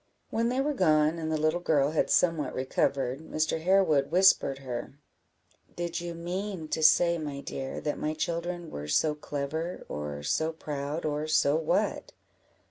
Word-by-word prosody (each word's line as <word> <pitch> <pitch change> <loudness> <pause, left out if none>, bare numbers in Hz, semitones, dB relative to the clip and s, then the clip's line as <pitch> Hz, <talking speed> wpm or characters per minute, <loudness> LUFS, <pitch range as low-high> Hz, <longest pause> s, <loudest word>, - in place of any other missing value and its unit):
When 230 +1 +1
they 255 +2 0
were 295 +2 0
gone, 155 - +3
and 160 -1 -3
the 155 - +1
little 155 +3 +1
girl 150 -4 +2
had 155 - +1
somewhat 165 -6 +2
recovered, 130 0 0
Mr. 155 0 -2
Harewood 165 -6 +3
whispered 180 -6 +4
her 130 -1 -6 0.8
"Did 170 0 -3
you 170 -1 -5
mean 175 0 -4
to 160 - -1
say, 170 +2 +5
my 145 -3 -5
dear, 135 -1 -5
that 150 - -2
my 155 +1 -2
children 170 +1 -3
were 75 +1 -6
so 150 - +2
clever, 150 +4 -4
or 75 -1 -5
so 160 - 0
proud, 150 0 -4
or 150 0 -1
so 150 -2 +3
what?" 160 -1 0
155 Hz, 160 wpm, -28 LUFS, 140-170 Hz, 0.8 s, say